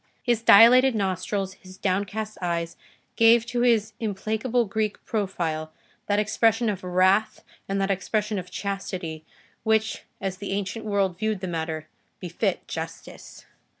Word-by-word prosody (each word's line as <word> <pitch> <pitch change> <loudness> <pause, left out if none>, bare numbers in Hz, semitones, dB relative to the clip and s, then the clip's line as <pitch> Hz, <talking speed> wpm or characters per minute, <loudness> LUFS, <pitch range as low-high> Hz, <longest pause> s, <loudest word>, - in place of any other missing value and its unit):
His 240 -3 +1
dilated 240 +4 +7
nostrils, 190 0 -2
his 185 0 -13
downcast 205 +3 -2
eyes, 170 -1 -2 0.4
gave 230 0 +6
to 240 0 -2
his 220 -3 +2
implacable 220 +3 -1
Greek 215 +1 -2
profile 170 -7 -2 0.4
that 205 - +2
expression 225 +2 +2
of 190 -2 -7
wrath 185 +4 +2 0.3
and 195 0 0
that 195 0 +1
expression 210 +2 -1
of 180 0 -9
Chastity 180 -5 -4 0.4
which, 220 0 +1 0.2
as 190 -1 -3
the 200 0 -4
ancient 205 +3 -3
world 195 -4 0
viewed 215 -2 -1
the 185 - -4
matter, 160 -2 -4 0.3
befit - - -2
Justice. - - -8
200 Hz, 135 wpm, -25 LUFS, 185-220 Hz, 0.4 s, dilated